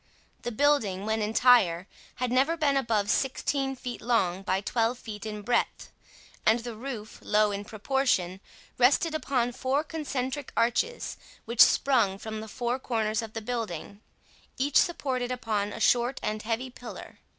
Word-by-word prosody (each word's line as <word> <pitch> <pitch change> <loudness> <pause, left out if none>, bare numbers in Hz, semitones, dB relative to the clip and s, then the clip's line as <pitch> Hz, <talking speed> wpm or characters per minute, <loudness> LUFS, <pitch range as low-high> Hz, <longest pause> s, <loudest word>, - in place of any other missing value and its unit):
The 240 - -3
building, 220 -7 +2
when 220 0 0
entire, 210 -5 +4 0.3
had 250 -1 -2
never 275 +7 +2
been 290 -3 +2
above 230 -6 +1
sixteen 270 0 0
feet 250 -1 -6
long 195 -6 +1
by 190 -1 0
twelve 230 +4 0
feet 220 -3 -7
in 210 -1 -6
breadth, 240 +3 -1 0.5
and 225 +2 +4
the 235 0 -6
roof, 225 -3 -7
low 210 0 +2
in 200 0 -4
proportion, 215 -4 0 0.4
rested 280 +6 +4
upon 255 -6 0
four 260 +4 0
concentric 285 -3 -4
arches 245 - 0 0.3
which 235 0 +2
sprung 230 -8 +5
from 215 +1 -6
the 220 - -8
four 245 +3 -2
corners 220 -3 -1
of 220 -1 -8
the 225 - -5
building, 215 -4 -4 0.6
each 275 +1 +2
supported 255 -7 +1
upon 215 -4 -1
a - - -7
short 245 +2 +2
and 215 0 -2
heavy 235 +4 -3
pillar. 245 -1 -10
235 Hz, 150 wpm, -28 LUFS, 215-260 Hz, 0.6 s, sprung